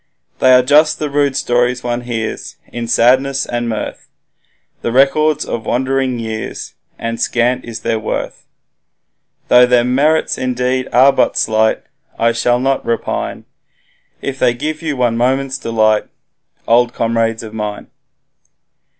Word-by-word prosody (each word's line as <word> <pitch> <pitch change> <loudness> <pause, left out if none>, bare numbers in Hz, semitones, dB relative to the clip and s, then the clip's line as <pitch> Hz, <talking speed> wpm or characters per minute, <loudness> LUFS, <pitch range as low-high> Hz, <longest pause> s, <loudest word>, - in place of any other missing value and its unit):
They 130 - +5
are 125 0 +6
just 150 +4 +4
the 150 -2 -4
rude 140 -1 +1
stories 125 +1 0
one 120 0 -2
hears 115 -3 -5 0.2
In 120 -1 -4
sadness 130 +4 +2
and 120 0 -3
mirth, 110 -2 -5 0.7
The 115 - -2
records 150 +4 +2
of 110 -2 -5
wandering 130 0 0
years, 110 -1 -6 0.2
And 115 0 -4
scant 125 +1 0
is 115 -1 -7
their 115 -1 -1
worth 110 - -5 1.0
Though 125 0 +6
their 125 -1 +3
merits 140 +6 +1
indeed 125 0 -1
are 135 +3 +5
but - - +1
slight, 110 0 +1 0.3
I 115 0 +2
shall 120 +1 +1
not 135 +1 0
repine, 115 - -3 0.8
If 135 -1 -4
they 120 -1 +2
give 155 +5 -4
you 155 -4 -3
one 120 -2 +1
moment's 130 +2 0
delight, 110 -2 +1 0.6
Old 120 +1 +3
comrades 115 -1 0
of 110 -1 -9
mine. 105 -1 -5
125 Hz, 140 wpm, -16 LUFS, 115-135 Hz, 1.0 s, are